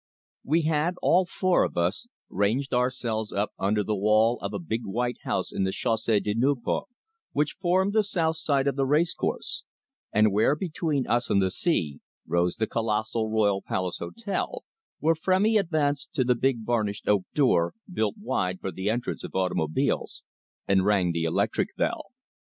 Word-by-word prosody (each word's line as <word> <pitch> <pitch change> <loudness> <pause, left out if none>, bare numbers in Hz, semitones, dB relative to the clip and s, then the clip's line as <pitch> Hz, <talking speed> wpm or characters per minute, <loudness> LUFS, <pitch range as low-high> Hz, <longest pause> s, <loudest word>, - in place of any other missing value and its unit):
We 160 +4 +2
had, 160 +3 +1
all 180 +1 +4
four 185 0 +2
of - - -3
us, 85 - 0 0.2
ranged 110 +9 0
ourselves 125 -3 -1
up 100 +2 -1
under 105 +2 +1
the 105 +1 -1
wall 110 +3 +3
of 100 - -4
a 100 - -3
big 110 +7 -3
white 120 +4 -2
house - - -2
in - - 0
the 95 - 0
Chausee 110 -1 +1
de 105 0 -2
Nieuport, 135 - 0 0.5
which 150 +1 0
formed 190 +3 +2
the 220 - +4
south 165 -6 0
side 140 -4 +1
of 140 - +1
the 135 -1 0
racecourse, 155 +5 0 0.5
and 105 0 +4
where, 110 +8 +3
between 155 -4 -2
us 120 0 0
and 100 - +3
the 95 -1 +1
sea, 80 - 0 0.3
rose 85 0 +1
the 110 - 0
colossal 110 0 -1
Royal 105 -3 +2
Palace 90 -2 -3
Hotel, 210 -4 -4 0.3
when 160 +2 +3
Frémy 190 +6 +2
advanced 150 -6 -1
to 130 - +3
the 125 0 +3
big 120 -2 0
varnished 105 -4 -1
oak 100 -3 +3
door, 125 - +3 0.2
built 110 -9 0
wide 95 - -1
for 95 - -4
the 95 +4 -2
entrance 120 +2 -2
of - - -8
automobiles, 90 -4 -1 0.4
and 95 -1 +3
rang 95 -3 +2
the 85 -1 -1
electric 80 - 0
bell. - - -1
115 Hz, 170 wpm, -26 LUFS, 100-150 Hz, 0.5 s, all